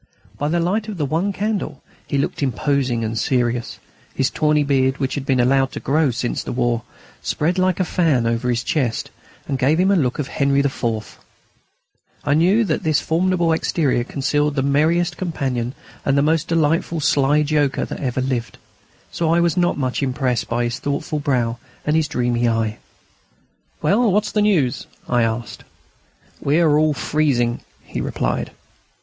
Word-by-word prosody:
By 145 - 0
the 170 +2 +1
light 200 +6 0
of 210 -3 -5
the 150 - 0
one 165 +8 0
candle 205 +1 -3 0.2
he 140 - -1
looked 140 - -1
imposing 130 -2 0
and 110 +1 -2
serious. 120 +1 0 0.4
His 135 0 +1
tawny 150 -1 +2
beard, 135 -1 +1
which 135 -1 -2
he 145 - -2
had 135 -1 0
allowed 135 +2 +3
to - - -4
grow 150 +1 +2
since 120 0 -2
the - - -5
war, 120 -2 0 0.4
spread 175 +5 0
like 185 -1 +1
a 185 - +2
fan 160 -9 +1
over 115 +2 0
his 120 0 0
chest, 125 -7 -1 0.4
and 135 -2 -2
gave 145 +5 +3
him 190 +2 +4
a - - +4
look 130 -8 +1
of 145 - -2
Henri 140 0 +2
IV. 115 -6 -3 1.1
I 145 - +2
knew 185 +9 +4
that - - -1
this 155 -2 +2
formidable 170 +1 +1
exterior 145 -6 +1
concealed 145 +3 0
the 135 - +1
merriest 160 +4 +2
companion 130 -8 -2 0.3
and 140 0 +2
the 140 - +4
most 155 +1 +1
delightful 165 0 +1
sly 145 0 +3
joker 145 -2 +1
that - - -6
ever 130 -2 -1
lived. 130 -3 -2 0.5
So 165 -1 0
I 170 - +4
was 170 -1 +2
not 175 -1 +1
much 130 -1 -1
impressed 130 -2 -1
by 120 +1 0
his 120 +2 -2
thoughtful 145 +1 -2
brow 120 -5 0 0.3
and 150 - +1
his 160 -1 +2
dreamy 120 -3 0
eye. 115 -1 -1 1.0
"Well, 220 +2 +3
what's 210 +2 +1
the 210 - +1
news?" 170 - +1 0.2
I 120 -1 +2
asked. 115 +1 -2 0.8
"We 145 +4 +2
are 155 -3 +4
all 155 -1 +2
freezing," 125 -5 0 0.2
he - - -5
replied. - - -2
140 Hz, 175 wpm, -20 LUFS, 125-160 Hz, 1.1 s, him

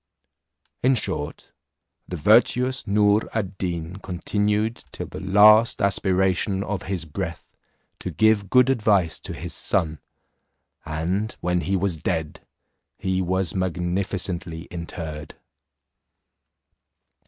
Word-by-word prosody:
In 130 +1 +4
short, 75 -9 -3 0.6
the 90 - -5
virtuous 125 - +3
Noor 105 +1 +3
ad 95 -4 -3
Deen 85 -1 -3
continued 105 +4 -1
till - - -5
the - - -8
last 105 +4 +6
aspiration 95 0 +1
of 105 -1 -3
his 90 -4 -2
breath 85 +1 -5 0.5
to - - -4
give 110 -3 +2
good 125 +2 +5
advice 105 -8 +2
to - - -8
his - - -6
son; 80 -1 0 0.9
and 90 +8 -2
when 90 0 0
he 95 - -1
was 95 -2 0
dead 80 -1 -3 0.6
he 95 0 -1
was 95 -1 -1
magnificently 90 -1 -2
interred. 80 -3 -7
95 Hz, 110 wpm, -24 LUFS, 85-105 Hz, 0.9 s, last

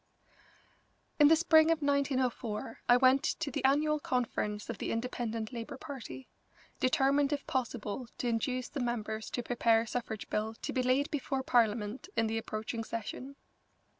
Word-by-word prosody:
U. - - -31 0.8
In 295 - +8
the 320 - +7
spring 320 -1 +5
of 325 -2 +1
1904 260 -6 -1
I 245 - +8
went 260 +1 +5
to 310 -1 -2
the - - -3
annual 300 +3 +3
conference 220 -6 -2
of 230 -4 -5
the - - -2
Independent 230 -1 -3
Labour 235 +1 -6
Party, 245 - -8 0.5
determined 275 +2 +3
if 285 -1 -2
possible 245 -2 -3
to 245 - -2
induce 250 +2 -1
the 285 - -6
members 220 -3 -3
to 245 - -3
prepare 230 -1 +3
a 230 - -5
suffrage 220 -3 -4
bill 220 +1 -1
to - - -3
be 255 - +1
laid 255 +3 +1
before 270 -2 -2
Parliament 230 - +1
in 225 - +3
the 225 0 -1
approaching 225 +1 -4
session. 230 +5 -6
245 Hz, 165 wpm, -32 LUFS, 225-275 Hz, 0.8 s, In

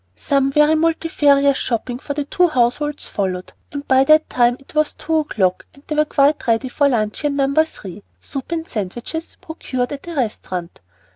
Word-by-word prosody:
Some 275 - +1
very 300 +2 +4
multifarious 295 -4 +3
shopping 245 +1 -2
for 285 0 -5
the 290 -1 -2
two 360 +5 +2
households 290 +1 0
followed, 185 -2 -3 0.2
and 285 0 -6
by 265 0 +5
that 310 +2 +4
time 245 0 +3
it 275 - -18
was 305 -1 +1
two 320 0 -1
o'clock 200 -12 0
and 280 - -19
they - - -4
were 305 0 +3
quite 285 -1 +2
ready 230 +3 +1
for 285 +2 +2
luncheon 240 +5 -1
No. 275 0 +1
3, 280 - -1 0.2
soup 275 +2 -7
and 330 -1 -3
sandwiches, 240 - -5
procured 255 -6 -4
at 285 +3 -7
a 340 - -6
restaurant. 185 - -3
280 Hz, 175 wpm, -20 LUFS, 240-305 Hz, 0.2 s, by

